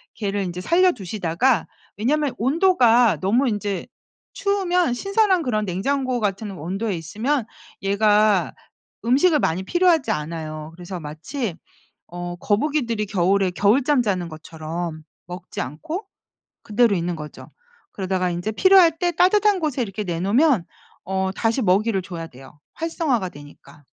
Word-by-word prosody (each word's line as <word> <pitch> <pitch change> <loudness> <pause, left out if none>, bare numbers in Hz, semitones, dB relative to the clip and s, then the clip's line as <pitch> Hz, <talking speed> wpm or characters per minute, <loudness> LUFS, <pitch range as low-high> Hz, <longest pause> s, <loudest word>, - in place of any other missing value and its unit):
걔를 205 -2 -2
인제 180 -1 -5
살려 360 - +4
두시다가 200 - 0 0.3
왜냐하면 280 +5 0
온도가 245 - +4
너무 235 +8 +2
인제 205 -3 -2 0.5
추우면 360 -7 +1
신선한 395 - +2
그런 215 -6 -1
냉장고 255 +7 -1
같은 205 0 -2
온도에 195 +4 -3
있으면 220 - -2 0.4
얘가 205 -1 +3 0.5
음식을 290 +6 +4
많이 175 -2 0
필요하지 335 - +2
않아요. 155 -2 -5
그래서 180 +1 -7
마치 165 - -5 0.5
어 175 0 -6
거북이들이 230 - 0
겨울에 195 0 +2
겨울잠 245 - +3
자는 185 -6 -1
것처럼 160 0 -6 0.2
먹지 180 0 -7
않고 310 - -6 0.6
그대로 225 0 +2
있는 175 -1 -2
거죠. 150 -1 -10 0.4
그러다가 185 -2 -1
인제 175 +5 -3
필요할 360 - +5
때 350 +1 +1
따뜻한 400 +4 +3
곳에 300 -6 -1
이렇게 210 -1 -4
내놓으면 200 - +2 0.4
어 190 0 -1
다시 225 +5 0
먹이를 200 +1 +2
줘야 170 -3 -7
돼요. 135 +1 -16
활성화가 305 - -1
되니까. 145 0 -15
210 Hz, 315 characters per minute, -22 LUFS, 175-275 Hz, 0.6 s, 필요할